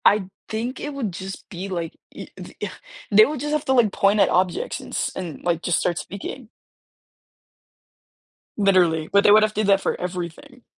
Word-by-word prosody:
I'd 200 -2 +4 0.2
think 235 +4 -3
it 295 - -4
would 235 -9 -3
just 190 +2 -7
be 185 +2 -6
like 170 -3 -3 0.2
i - - -8
the - - -10
uh, - - -19
yeah, - - -3 0.4
they 215 +2 +8
would 295 -1 -4
just 295 +3 -2
have 305 -1 0
to, 265 - +2
like, 235 -5 +4
point 200 +1 +3
at - - +5
objects 185 - 0
and - - -11
s - - -1
and, 175 -5 -6
like, 170 -2 0
just 175 -2 +1
start 175 -1 0
speaking. 215 +6 -7 2.1
Literally, 180 -6 +3
but 200 0 +5
they - - +6
would 215 +1 +7
have 215 0 +1
did 215 -1 0
that 195 -1 +4
for - - -1
everything. 180 - -6
200 Hz, 200 wpm, -23 LUFS, 180-230 Hz, 2.1 s, they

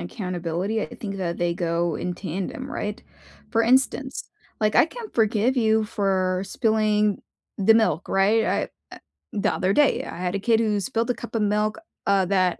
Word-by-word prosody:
accountability, 180 - -3
I - - -2
think 200 -2 -6
that 170 -2 -2
they 175 0 0
go 170 -2 -1
in 180 -1 -3
tandem, 195 - -5
right? 210 -5 -4 0.5
For 230 -1 +2
instance, 265 +2 +1 0.3
like, 215 -1 +1
I 245 - +6
can 455 +4 -9
forgive 225 +3 +2
you 220 -2 +3
for 190 -3 0
spilling 215 -2 +1 0.4
the 210 +3 +5
milk, 220 -6 +2
right, 210 +4 +3
I - - +1 0.3
uh - - -12 0.4
the 205 - +1
other 185 +1 +1
day, 290 +5 +3
I - - -8
had 180 +1 -2
a - - 0
kid 225 +2 +2
who 215 -2 +1
spilled 230 +2 -1
a - - +2
cup 235 +1 -9
of 225 - +1
milk, 210 +3 +1 0.3
uh, 200 -1 +3
that 185 -2 +1
210 Hz, 180 wpm, -24 LUFS, 185-225 Hz, 0.5 s, I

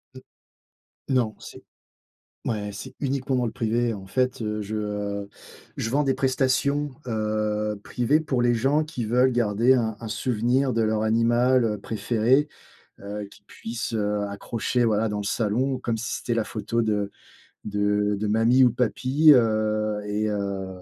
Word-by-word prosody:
Heu. - - -10 0.9
Non, 125 -5 +1
c'est - - -11 0.8
ouais, 105 -3 -2
c'est 100 - -8
uniquement 135 -1 -1
dans 125 -1 +1
le 115 - -2
privé. 115 0 0
En 95 -2 -9
fait, 125 +4 0
heu, 105 -1 -2
je, 105 +1 -5
heu, 105 -1 -3 0.5
je 110 - -2
vends 145 +4 +2
des 135 - +2
prestations, 135 +2 +1 0.2
heu, 105 -1 -1
privées 125 +5 +1
pour 135 -6 -1
les 120 0 +3
gens 135 +6 +2
qui 150 -7 -5
veulent 125 +4 +3
garder 120 +1 +3
un 110 -4 0
un 115 - -7
souvenir 125 +4 0
de 115 - +1
leur 110 0 +1
animal, 120 +3 +3
heu, 105 -1 -1
préféré, 115 +7 +1 0.5
heu, 105 +1 -5
qu'ils 100 - -19
puissent, 115 +3 -6
heu, 105 -1 0
accrocher, 115 +4 -1
voilà, 110 0 +2
dans 105 -1 -3
le 105 - -4
salon 120 +6 0
comme 120 -3 -2
si 115 +1 -3
c'était 120 - -2
la 115 - 0
photo 115 +2 -2
de 105 -2 0 0.6
de 105 0 +1
de 105 - -1
mamie 115 +5 +4
ou 125 - +6
de 120 - -7
papi, 130 +5 +4
heu 110 -3 +1
et 105 +1 -1
heu 100 -2 -3
115 Hz, 165 wpm, -25 LUFS, 105-125 Hz, 0.9 s, ou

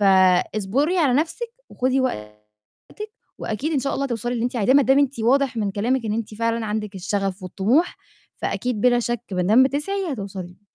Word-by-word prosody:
فاصبُري 200 - +3
على 275 -7 +3
نَفْسِك 330 - -1 0.2
وخُدي 260 +1 0
وقتِك 105 - -7 0.3
وأكيد 270 +9 -3
إن 290 - +2
شاء 275 - -2
الله 275 - -1
هتوصلي 240 -1 -2
للي 235 0 -1
أنتِ 250 0 -2
عايزاه، 235 +5 +3
ما 285 - +7
دام 270 +2 +4
أنتِ 280 -3 +1
واضح 260 +1 +2
من 205 -3 0
كلامِك 230 +5 0
إن 210 - -1
أنتِ 220 -1 -4
فعلًا 230 0 -1
عندِك 210 -1 -3
الشغف 195 0 -2
والطموح، 215 - +1 0.4
فأكيد 245 -4 -2
بلا 245 0 +4
شَك 240 -1 -2
با 180 -1 0
دام 220 +8 +5
بتسعي 315 +5 -1
هتوصلي. 190 -4 -7
230 Hz, 180 wpm, -22 LUFS, 200-270 Hz, 0.4 s, ما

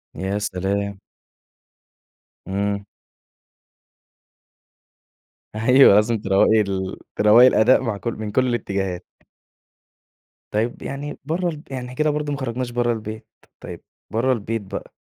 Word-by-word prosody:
يا 95 +2 -2
سلام! 100 +1 -2 1.5
إمم. 100 +1 -2 2.7
أيوه، 125 0 +6
لازم 110 +2 +3
تروّقي 100 +3 +3
ال 95 -1 -3 0.2
تروّقي 110 +5 +7
الأداء 125 +1 +4
مع 115 -5 -2
كل 115 +3 -4
من 105 -1 -6
كل 130 +3 +2
الإتجاهات. 95 -6 -2 1.5
طيب 110 +3 -1
يعني 140 +2 -6
برّه 175 +3 -1
الب 155 -1 -8
يعني 130 -1 -4
إحنا 125 0 -8
كده 155 +2 +1
برضه 150 0 -2
ما 140 - -4
خرجناش 125 -1 -3
برّه 120 0 +1
البيت. 110 0 -7 0.3
طيب - - -9 0.3
برّه 120 +4 +1
البيت 115 -1 -3
بَقى، 95 - -8
110 Hz, 120 wpm, -22 LUFS, 100-125 Hz, 2.7 s, تروّقي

